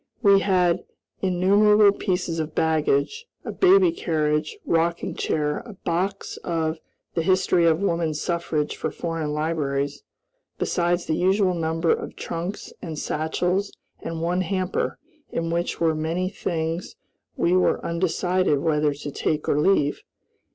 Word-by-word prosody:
We 200 -2 +7
had 180 -3 +2 0.4
innumerable 200 +3 +5
pieces 180 -4 -1
of 155 -1 -4
baggage, 160 - +1 0.2
a - - -3
baby 375 -1 +5
carriage, 155 - -1
rocking 170 +1 0
chair, 150 -1 -1
a 235 -2 -10
box 190 +2 -3
of 160 -2 -2 0.3
"The 165 - 0
History 180 0 +3
of 160 +2 +3
Woman 170 -4 0
Suffrage" 155 -2 -1
for 155 - -3
foreign 165 -1 -3
libraries, 150 - -1 0.6
besides 175 0 0
the - - -1
usual 190 +2 +2
number 165 0 0
of - - -2
trunks 175 +4 -5
and 160 -4 -6
satchels, 180 +7 -1 0.3
and 165 0 -4
one 175 +2 +1
hamper, 185 0 -1 0.3
in 165 0 -2
which 170 +1 -1
were 165 -1 +3
many 165 +4 -1
things 165 -2 -3 0.4
we 170 - +2
were 185 - +3
undecided 180 -1 +1
whether 150 -1 +1
to 145 0 -6
take 150 +2 -1
or 145 - +2
leave. 150 -3 +2
170 Hz, 135 wpm, -24 LUFS, 155-185 Hz, 0.6 s, We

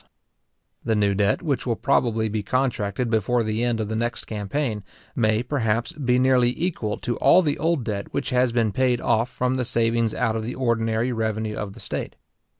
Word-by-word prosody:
} - - -52
The 115 -1 +1
new 100 -1 +2
debt 100 - +1
which 140 -5 -1
will 115 - +1
probably 115 -3 +1
be 110 0 -2
contracted 125 -1 -1
before 115 +2 +1
the 110 +1 -1
end 120 -2 0
of 110 - -2
the 110 - -3
next 120 +2 -2
campaign, 110 +1 -3 0.3
may, 110 -1 +2
perhaps, 120 -4 -1
be 125 -4 0
nearly 125 -1 +4
equal 155 - -2
to 120 -2 -3
all 185 - +5
the 145 -3 -1
old 165 -4 +1
debt 100 -3 -4
which - - -2
has 125 -1 +2
been 115 -2 +1
paid 125 +2 +1
off 115 0 +1
from 125 0 -1
the 130 -1 0
savings 115 -1 +1
out 115 -3 0
of 110 - -1
the 115 +3 -5
ordinary 115 -1 0
revenue 110 -2 -2
of 100 -2 -5
the - - -13
state. - - -4
115 Hz, 200 wpm, -24 LUFS, 110-125 Hz, 0.3 s, all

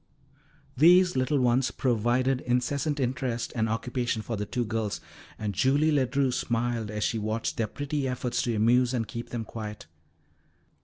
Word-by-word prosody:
These 180 +5 +6
little 130 +3 +1
ones 125 +1 +2
provided 125 +2 +1
incessant 140 +4 0
interest 125 -2 -2
and 110 -1 0
occupation 120 0 -2
for 115 - -3
the 105 -1 -4
two 120 -1 -1
girls, 110 -2 -2 0.4
and 105 -2 -3
Julie 140 - +3
Ledru 135 -1 +2
smiled 120 -2 -1
as 105 0 -3
she 115 - 0
watched 110 +2 -2
their 115 - 0
pretty 145 +3 -3
efforts 125 -1 -1
to 120 -2 -1
amuse 120 +4 +3
and 115 -3 -1
keep 115 +3 -6
them 115 -2 -4
quiet. 105 -2 -7
120 Hz, 155 wpm, -27 LUFS, 115-130 Hz, 0.4 s, These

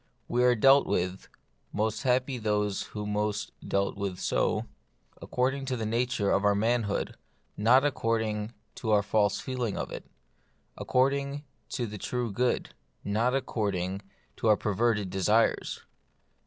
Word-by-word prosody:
We 125 +1 +1
are 125 0 +5
dealt 135 +5 +6
with 90 +2 -1 0.2
— - - -43
most 110 +1 -1
happy 130 0 +1
those 105 -2 0 0.2
who 105 - -3
most 105 0 -1
are - - -11
dealt 100 0 0
with 100 -3 -3
so - - 0 0.6
according 135 +2 -1
to 130 -1 -2
the 110 - -3
nature 115 -2 0
of 100 - +2
our 100 0 +4
manhood, 110 -1 0 0.4
not 125 +6 +5
according 110 -4 -1 0.2
to 110 - -4
our 105 -1 +4
false 100 -1 +2
feeling 125 -5 -3
of - - -4
it; - - -7 0.7
according 140 +2 0 0.3
to 120 - -2
the 105 -2 -7
true 120 0 -2
good, 125 +5 0 0.3
not 115 +5 +1
according 100 -7 -1 0.4
to - - -1
our 105 -1 +6
per 105 - -1
verted 105 -2 +1
desires. 105 +4 +1
110 Hz, 150 wpm, -29 LUFS, 105-125 Hz, 0.7 s, dealt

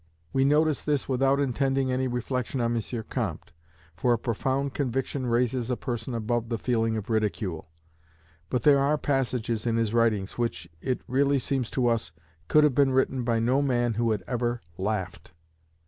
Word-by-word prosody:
We 135 0 +3
notice 150 +1 +3
this 145 -3 -1
without 135 +1 +2
intending 135 0 +1
any 130 +1 0
reflection 125 +1 -2
on 120 0 +1
M. 115 0 -3
Comte; - - -4 0.4
for 120 +8 +2
a - - +2
profound 130 +4 -1
conviction 135 0 -2
raises 120 0 +1
a 125 - 0
person 120 0 -4
above 115 +1 -1
the 115 - -1
feeling 115 -1 0
of 110 0 -5
ridicule. 105 -7 -1 0.8
But 125 -3 -1
there 140 -2 +6
are 145 +2 +2
passages 125 -5 -1
in 115 -1 +1
his 115 -1 0
writings 115 -3 +1
which, 115 -8 -2
it 130 -1 -1
really 140 +2 +2
seems 130 -2 -1
to 125 - +3
us, 115 -9 +1 0.4
could 150 - +5
have 150 -3 +4
been 135 +1 +3
written 130 0 +1
by 115 -1 +1
no 125 +5 +2
man 120 -4 +1
who 115 +1 0
had 105 -4 -1
ever 120 -1 -1 0.2
laughed. 95 -4 -3
120 Hz, 175 wpm, -27 LUFS, 115-135 Hz, 0.8 s, there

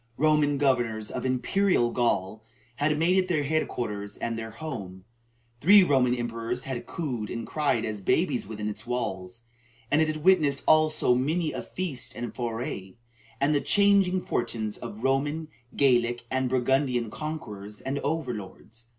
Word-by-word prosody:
Roman 150 -1 +3
governors 120 -6 +1
of - - -3
"Imperial 130 +1 +2
Gaul" 110 -3 0 0.3
had 150 +1 +1
made 175 +4 +3
it 185 - 0
their 160 -5 +1
head 155 +2 0
quarters 105 -3 -4
and 115 -1 -3
their 110 0 -5
home; 105 -8 -7 0.5
three 195 +8 +7
Roman 130 -6 +3
emperors 120 +1 -3
had 130 -3 -5
cooed 125 -10 -4
and 115 -1 -4
cried 140 -7 0
as 105 -2 -4
babies 135 - +1
within 105 -1 -5
its 105 +2 -6
walls; 115 -3 -4 0.5
and 150 - +4
it 160 - +3
had 155 -1 -3
witnessed 155 -7 +4
also 155 -4 +4
many 155 +6 0
a - - -4
feast 165 -10 -4
and 120 0 -5
foray, 115 -6 -4 0.4
and 140 +2 +2
the 145 - +2
changing 200 -2 +3
fortunes 110 -7 -2
of 110 +3 -8
Roman, 145 +4 0 0.3
Gallic, 120 -3 +2
and 130 -1 0
Burgundian 125 -2 +1
conquerors 105 -10 -6
and 135 +2 -3
over 145 -3 -2
lords. 105 +3 -10
130 Hz, 155 wpm, -27 LUFS, 115-155 Hz, 0.5 s, three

